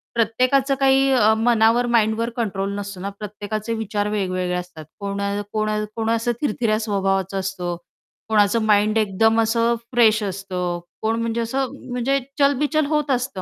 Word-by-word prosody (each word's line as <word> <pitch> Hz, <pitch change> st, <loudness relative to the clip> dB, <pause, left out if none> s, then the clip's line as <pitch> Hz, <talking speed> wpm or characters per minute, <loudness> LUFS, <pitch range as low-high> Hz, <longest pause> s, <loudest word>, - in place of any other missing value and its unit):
प्रत्येकाचं 255 Hz, +5 st, +2 dB
काही 270 Hz, 0 st, +4 dB, 0.2 s
मनावर, 230 Hz, +1 st, +3 dB
माइंडवर 230 Hz, 0 st, +2 dB
कंट्रोल 200 Hz, -4 st, -2 dB
नसतो 200 Hz, -2 st, -7 dB
ना 200 Hz, -, -3 dB
प्रत्येकाचे 210 Hz, +2 st, -4 dB
विचार 210 Hz, -2 st, -2 dB
वेगवेगळे 185 Hz, -3 st, -1 dB
असतात. 180 Hz, -3 st, -7 dB
कोण 200 Hz, 0 st, -3 dB, 0.3 s
कोण 215 Hz, 0 st, 0 dB, 0.3 s
कोण 225 Hz, -1 st, -1 dB
असं 230 Hz, +1 st, +1 dB
थिरथऱ्या 220 Hz, -5 st, 0 dB
स्वभावाचं 195 Hz, -3 st, -1 dB
असतं, 185 Hz, -2 st, -3 dB, 0.5 s
कोणाचं 215 Hz, +1 st, +3 dB
माइंड 210 Hz, +1 st, +3 dB
एकदम 225 Hz, +2 st, +3 dB
असं 230 Hz, +1 st, +2 dB, 0.2 s
फ्रेश 225 Hz, -3 st, +4 dB
असतं 185 Hz, -3 st, -3 dB, 0.2 s
कोण 220 Hz, +1 st, 0 dB
म्हणजे 230 Hz, 0 st, -1 dB
असं 260 Hz, +3 st, -2 dB, 0.2 s
म्हणजे 250 Hz, +3 st, +1 dB, 0.2 s
चलबिचल 290 Hz, +2 st, +2 dB
होत 300 Hz, -1 st, 0 dB
असतं 250 Hz, -6 st, -1 dB
220 Hz, 140 wpm, -22 LUFS, 200-240 Hz, 0.5 s, काही